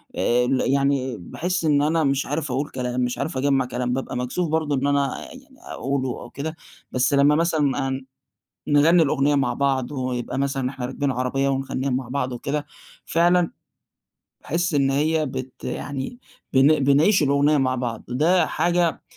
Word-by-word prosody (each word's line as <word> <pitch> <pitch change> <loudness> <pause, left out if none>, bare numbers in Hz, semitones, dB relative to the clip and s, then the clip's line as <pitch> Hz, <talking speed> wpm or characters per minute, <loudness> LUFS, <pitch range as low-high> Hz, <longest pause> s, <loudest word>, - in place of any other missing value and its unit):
آآ 125 +1 +2
ال 130 0 +1
يعني 135 -3 +1
باحِسّ 170 - -3
إن 145 -2 +3
أنا 160 +2 +2
مش 140 0 +1
عارف 145 -2 -3
أقول 140 +4 -1
كلام، 125 0 -3
مش 125 0 -1
عارف 140 0 -3
أجمّع 135 -1 +2
كلام، 125 0 -2
بابقى 130 -1 -3
مكسوف 150 +7 -2
برضه 155 -2 0
إن 140 +1 0
أنا 140 -1 +1
يعني 265 0 -15
أقولُه 135 -1 -3
أو 120 - -10
كده، 155 +3 -5 0.4
بس 130 +3 +1
لمّا 140 +1 +5
مثلًا 150 -5 +1
آآ 135 0 -3 0.7
نغنِّي 160 +4 +5
الأغنية 145 0 +2
مع 140 0 +1
بعض، 135 -2 0
ويبقى 130 -2 -3
مثلًا 135 -2 -1
إحنا 130 -2 -5
راكبين 135 +2 -2
عربية 130 +2 0
ونغنِّيها 135 0 -2
مع 130 -1 -2
بعض 130 0 -2
وكده، 145 +4 -3 0.4
فعلًا 175 +1 +3 0.9
باحِسّ 170 +1 -1
إن 135 -1 +3
هي 155 +2 +1
بت 130 0 -7
يعني 140 - -5 0.3
بن 140 +2 +4
بنعيش 150 +7 +4
الأغنية 145 +2 +3
مع 130 -2 +1
بعض، 120 -2 -4
وده 160 +9 +2
حاجة 175 -2 0
140 Hz, 165 wpm, -23 LUFS, 130-155 Hz, 0.9 s, لمّا